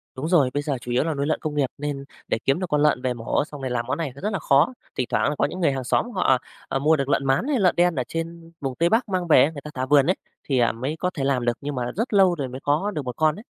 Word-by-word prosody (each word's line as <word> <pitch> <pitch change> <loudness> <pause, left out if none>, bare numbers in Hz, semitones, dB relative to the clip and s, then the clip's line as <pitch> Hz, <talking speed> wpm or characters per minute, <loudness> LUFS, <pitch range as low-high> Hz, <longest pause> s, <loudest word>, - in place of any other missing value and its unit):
Đúng 135 +4 -3
rồi, 160 -7 +4
bây 145 - -1
giờ 140 -2 -1
chủ 125 - -6
yếu 125 +2 +2
là 160 0 -1
nuôi 140 -1 -2
lợn 155 - 0
công 150 -1 -4
nghiệp 145 -2 +2
nên 145 -1 -4 0.2
để - - 0
kiếm 135 +4 +2
được 185 - -2
con 150 0 +2
lợn 150 -4 +3
về 130 -1 0
mổ 120 +3 -1
xong 145 -2 -10
rồi 130 - -3
làm 120 -1 -1
món - - -1
này 160 -5 -3
nó 140 - -11
rất 210 +1 -2
là 195 - -1
khó. 140 - +3 0.2
Thỉnh 125 - -1
thoảng - - +2
là 150 - -2
có - - +2
những 185 - -5
người 165 -5 +3
hàng 135 -1 -3
xóm 230 - 0
họ, 195 - -2
à, 130 - +5 0.3
ờ, 135 - -1
mua 155 +3 +4
được 140 -2 -2
lợn 135 -1 +1
mán 135 - +1
hay 285 -4 +1
lợn 185 -3 +3
đen 175 -1 +3
ở 130 - 0
trên 165 +1 -6
vùng 135 -2 -3
Tây 170 +4 +2
Bắc 225 +2 +1
mang 185 -2 -1
về 150 -5 +7
ấy, 150 - +1
người 145 -3 -8
ta 150 - -9
thả 130 0 -2
vườn 140 0 +5
ấy, 185 - +3 0.3
thì, 135 -3 0
à, 120 - +3
mới 130 +7 -4
có 180 - 0
thể 140 - -3
làm 135 -3 +1
được, 120 -1 0
nhưng 145 0 -4
mà 125 -1 -2
rất 225 +4 -2
lâu 190 -3 +5
rồi 140 -5 -3
mới 130 +1 -7
có 155 +9 +1
được 155 - -3
1 125 -1 -4
con 155 -1 +2
ấy. 210 - -10
145 Hz, 340 wpm, -24 LUFS, 135-170 Hz, 0.3 s, về